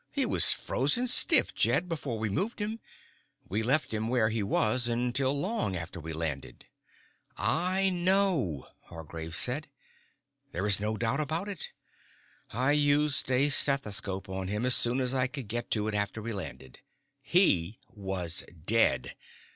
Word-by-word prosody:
He - - -1
was - - +2
frozen 145 - +1
stiff, 250 - +5
Jed, 180 - +1
before 145 -8 -4
we 110 0 -2
moved 195 - -3
him. 215 +2 -4 0.7
We 105 +3 -2
left 135 +3 0
him 110 +1 -2
where 115 -3 +1
he 110 0 -2
was 110 +4 +1
until 125 +3 0
long 190 - -2
after 85 0 -7
we 80 0 -8
landed." 80 -4 -6 0.7
"I 185 +3 +1
know," 175 - 0 0.2
Hargraves 80 0 -6
said. 140 +6 +1 0.9
"There 90 +4 -3
is 100 -1 +4
no 110 +1 -3
doubt 120 +5 -1
about 160 +6 -2
it. 200 -7 -2 0.8
I 130 +5 0
used 145 -1 +1
a 130 +3 +2
stethoscope 105 -9 +1
on 95 0 -5
him 105 +5 -3
as 125 - +6
soon 120 +3 +6
as 125 0 -1
I 130 -1 +1
could 130 -4 -6
get 120 +3 -4
to 105 -1 -1
it 110 - -3
after 105 +1 -3
we 115 +1 -5
landed. 65 -10 -9 0.5
_He 105 - +3
was 95 -4 -1 0.2
dead. 115 +3 +1
120 Hz, 155 wpm, -28 LUFS, 100-145 Hz, 0.9 s, as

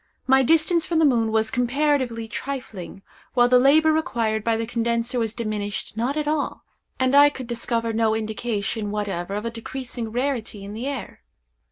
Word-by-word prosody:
My 265 0 +5
distance 325 +4 +3
from 335 - 0
the 320 - +5
moon 230 -5 +2
was 220 0 +1
comparatively 255 -2 0
trifling, 220 -7 -6 0.3
while 240 -1 +5
the 250 0 +5
labor 310 +4 +5
required 230 -10 0
by 230 0 +1
the 225 - -2
condenser 235 +1 -1
was 225 -1 -2
diminished 215 -3 -3
not 245 +6 -1
at 300 -1 -1
all, 300 -1 -1 0.4
and 260 +1 +2
I 290 +1 +8
could 260 -3 -7
discover 230 -1 -1
no 220 -1 +2
indication 220 -1 -2
whatever 200 -3 -3
of 210 +2 -4
a 230 - -2
decreasing 235 0 -6
rarity 240 -5 -2
in 200 +1 -7
the 235 +5 -4
air. 275 -4 -6
235 Hz, 175 wpm, -23 LUFS, 220-270 Hz, 0.4 s, I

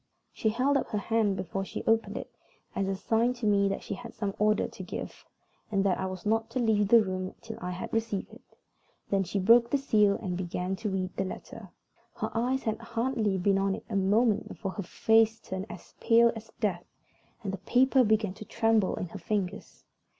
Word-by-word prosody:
She 220 - 0
held 260 +6 +2
up - - -2
her 210 - -2
hand 210 -1 +1
before 190 +1 -3
she - - -6
opened 225 0 +2
it - - -7 0.4
as 195 - 0
a 195 - 0
sign 225 +5 +1
to 240 -2 -6
me 200 -1 +3
that 195 - -3
she - - -4
had 230 +4 -9
some 200 -3 -2
order 215 0 +3
to - - -10
give, - - -7 0.4
and 195 -2 +2
that 190 -2 +1
I 190 - -1
was 185 +3 -7
not 225 +1 +1
to 250 +2 -2
leave 215 -4 +2
the 230 +1 +7
room 185 -1 -4
till 225 -1 -8
I 180 - -3
had 180 0 -5
received 225 -3 -2
it. - - -18 0.5
Then 195 -1 +3
she 195 - -3
broke 230 +5 +5
the 280 - +2
seal 210 -7 +3
and 185 -5 -4
began 180 +1 -2
to 215 - -3
read 190 -1 -3
the 195 - +1
letter. 190 - -8 0.5
Her - - -3
eyes 250 +4 0
had 220 0 -1
hardly 230 -3 -1
been 195 +1 +2
on 195 0 +1
it - - -10
a - - -2
moment 210 +3 +2
before 195 -3 -5
her 200 - -5
face 225 +4 +3
turned 190 +2 -5
as - - -11
pale 235 0 +5
as 225 0 -10
death, 185 -5 0 0.6
and 195 -2 -3
the 195 - -4
paper 255 +6 +4
began 215 -3 +2
to 215 +2 -10
tremble 225 -4 +2
in 180 - -4
her 200 - -8
fingers. 200 +1 -3
210 Hz, 215 wpm, -29 LUFS, 195-225 Hz, 0.6 s, the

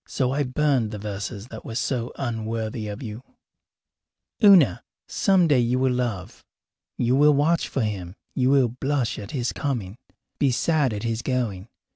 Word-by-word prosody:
So 130 -2 -1
I 140 +2 0
burned 135 -3 +1
the 105 - -6
verses 105 +2 -6
that 110 - -9
were 115 - -7
so 120 -1 -1
unworthy 115 -2 -3
of 105 +4 -6
you. 110 0 -7 1.2
Una, 175 - +6 0.3
some 190 -3 +3
day 145 -5 +4
you 120 +1 +1
will 130 0 +2
love. 120 -7 -3 0.5
You 120 +1 +2
will 145 +1 +5
watch 155 +4 +2
for 135 - -2
him; 95 -4 -4 0.2
you 130 -1 +1
will 135 -3 +4
blush 130 0 -2
at 100 -1 -8
his 125 -4 -2
coming, 115 -8 -3 0.4
be 140 - +3
sad 145 +1 +1
at 105 0 -4
his 115 -1 -2
going. 115 -7 -2
125 Hz, 165 wpm, -24 LUFS, 110-135 Hz, 1.2 s, Una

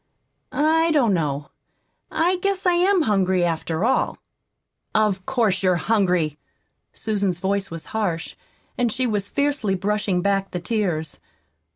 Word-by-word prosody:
I 320 +2 +3
don't 265 -10 +3
know 150 -4 -2 0.6
I 355 +3 +1
guess 390 +1 -1
I 360 - +4
am 360 0 +3
hungry, 190 -5 +2
after 165 +2 -1
all." 260 - +1 0.8
"Of 205 -4 +1
course 225 -8 +1
you're 185 -2 +3
hungry!" 180 -6 +1 0.5
Susan's 200 -5 -1
voice 195 +2 -1
was 165 -1 -7
harsh, 180 -7 -2 0.4
and 240 -2 +2
she 255 +4 0
was 205 -4 -1
fiercely 280 -9 0
brushing 195 -1 0
back 195 -1 +1
the 180 - -4
tears. 175 -6 -2
200 Hz, 135 wpm, -23 LUFS, 180-250 Hz, 0.8 s, I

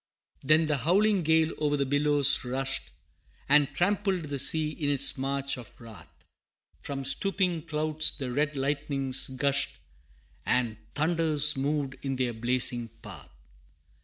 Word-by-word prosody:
IV. - - -14
Then 155 +2 +4
the 150 -2 0
howling 195 - +2
gale 160 0 +2
o'er 145 -1 +1
the 140 - 0
billows 145 0 +2
rushed, 130 +1 -3 0.6
And 145 0 +3
trampled 195 0 0
the 145 -2 -5
sea 155 +3 +2
in 150 -2 -3
its 140 -1 +4
march 140 0 -3
of 120 -4 -12
wrath; 115 -4 -13 0.7
From 135 -1 -6
stooping 175 +3 0
clouds 155 0 +1
the 130 -4 -5
red 145 +2 -1
lightnings 140 -1 -1
gushed, 140 +1 -1 0.7
And 120 -3 -1 0.2
thunders 155 -1 +3
moved 140 0 -2
in 135 -1 -3
their 125 -2 -2
blazing 120 +1 +2 0.2
path. - - -11
145 Hz, 135 wpm, -27 LUFS, 135-155 Hz, 0.7 s, Then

